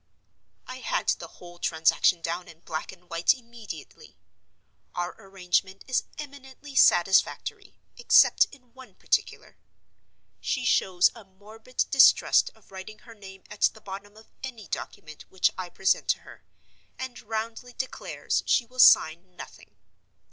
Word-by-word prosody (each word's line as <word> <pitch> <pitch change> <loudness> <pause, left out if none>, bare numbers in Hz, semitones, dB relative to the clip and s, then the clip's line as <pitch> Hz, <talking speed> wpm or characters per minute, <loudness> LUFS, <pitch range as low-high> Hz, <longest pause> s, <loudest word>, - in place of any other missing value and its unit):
I 255 - -8
had - - -2
the - - -1
whole 175 0 -15
transaction 165 +1 +2
down 170 +2 -3
in 165 0 -15
black 155 -2 -5
and 180 -1 -18
white 170 +8 +2
immediately. 230 - -12 0.8
Our 175 0 -3
arrangement 190 -1 -2
is 255 - 0
eminently 280 -1 -10
satisfactory, 190 -6 +2 0.2
except 485 - +5
in 250 -4 -20
one 260 0 -15
particular. - - -2 0.8
She 260 -2 -2
shows 185 -6 +3
a 230 - -13
morbid 215 +6 -5
distrust 270 -2 +5
of - - -25
writing 195 +3 -9
her 230 - -12
name 195 -3 -13
at 210 - -11
the 220 - +2
bottom 200 +2 -9
of 220 - -18
any 240 -6 -7
document 155 -1 -8
which 190 - +2
I 185 -1 -6
present 190 +2 0
to - - +1
her, - - -15 0.5
and 260 -2 -7
roundly 225 +3 -5
declares 260 - -3
she 245 - +3
will 255 +2 -15
sign 175 -4 +5
nothing. 100 - -12
205 Hz, 140 wpm, -26 LUFS, 180-250 Hz, 0.8 s, except